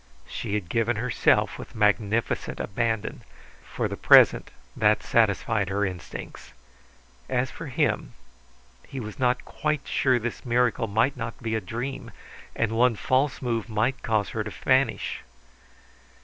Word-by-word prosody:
She 100 Hz, -, -4 dB
had 100 Hz, -5 st, -3 dB
given 115 Hz, +5 st, 0 dB
herself 120 Hz, +2 st, +1 dB
with -, -, -10 dB
magnificent 105 Hz, +1 st, 0 dB
abandon; 115 Hz, 0 st, -2 dB, 0.4 s
for -, -, -3 dB
the -, -, -5 dB
present -, -, +6 dB, 0.3 s
that -, -, +3 dB
satisfied 105 Hz, -4 st, +1 dB
her 100 Hz, +1 st, 0 dB
instincts. 90 Hz, -2 st, -8 dB, 0.8 s
As 130 Hz, 0 st, 0 dB
for 165 Hz, -, -8 dB
him, 120 Hz, -, -1 dB, 0.7 s
he 135 Hz, -, -6 dB
was 110 Hz, +3 st, -7 dB
not 125 Hz, -1 st, +1 dB
quite 150 Hz, -1 st, -2 dB
sure 130 Hz, -2 st, +2 dB
this 120 Hz, 0 st, -4 dB
miracle 120 Hz, -2 st, +1 dB
might 115 Hz, +6 st, +1 dB
not 115 Hz, -2 st, -6 dB
be 115 Hz, -1 st, -3 dB
a 110 Hz, -, 0 dB
dream, 120 Hz, +8 st, -5 dB, 0.5 s
and 115 Hz, -2 st, 0 dB
one 120 Hz, +1 st, +3 dB
false 130 Hz, +5 st, 0 dB
move 115 Hz, -2 st, -2 dB
might 110 Hz, +5 st, 0 dB
cause 110 Hz, -3 st, 0 dB
her 110 Hz, -, -3 dB
to 105 Hz, -, -5 dB
vanish. 130 Hz, +1 st, 0 dB
115 Hz, 140 wpm, -26 LUFS, 105-125 Hz, 0.8 s, present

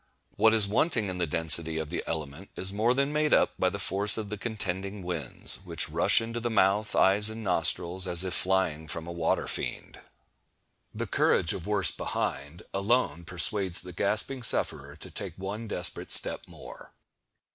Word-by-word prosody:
What 110 Hz, 0 st, +3 dB
is 105 Hz, -3 st, +8 dB
wanting 110 Hz, -, 0 dB
in 90 Hz, -1 st, -6 dB
the 85 Hz, -, -1 dB
density 80 Hz, +1 st, +2 dB
of 80 Hz, -1 st, -5 dB
the 85 Hz, -, -4 dB
element 80 Hz, +3 st, -6 dB
is 95 Hz, +1 st, +1 dB
more 115 Hz, +4 st, 0 dB
than 140 Hz, +2 st, -1 dB
made 150 Hz, 0 st, +2 dB
up -, -, +1 dB
by 95 Hz, -, +1 dB
the 100 Hz, -, -6 dB
force 100 Hz, +2 st, +1 dB
of 105 Hz, -2 st, -6 dB
the 105 Hz, -, -5 dB
contending 100 Hz, -3 st, -4 dB
winds, 85 Hz, -7 st, +1 dB
which -, -, -2 dB
rush -, -, +3 dB
into 115 Hz, +1 st, -6 dB
the 120 Hz, +1 st, -3 dB
mouth, 105 Hz, 0 st, 0 dB
eyes, 100 Hz, +2 st, +4 dB
and 110 Hz, 0 st, -7 dB
nostrils, 90 Hz, 0 st, 0 dB
as 90 Hz, 0 st, +1 dB
if 95 Hz, -, -4 dB
flying 90 Hz, -5 st, -1 dB
from 80 Hz, +1 st, -6 dB
a 85 Hz, -, -8 dB
water 85 Hz, -1 st, -2 dB
fiend. -, -, -5 dB, 0.9 s
The -, -, -5 dB
"courage 80 Hz, -, +1 dB
of 90 Hz, -, -8 dB
worse 105 Hz, -3 st, +2 dB
behind" 75 Hz, +5 st, -5 dB
alone 100 Hz, -5 st, -1 dB
persuades 90 Hz, +1 st, +2 dB
the 90 Hz, -, -11 dB
gasping 110 Hz, +8 st, +2 dB
sufferer 115 Hz, -, +1 dB
to -, -, -9 dB
take 95 Hz, -5 st, -6 dB
one 100 Hz, +4 st, -7 dB
desperate 90 Hz, -4 st, -3 dB
step -, -, +5 dB
more. -, -, -14 dB
95 Hz, 180 wpm, -26 LUFS, 85-110 Hz, 0.9 s, is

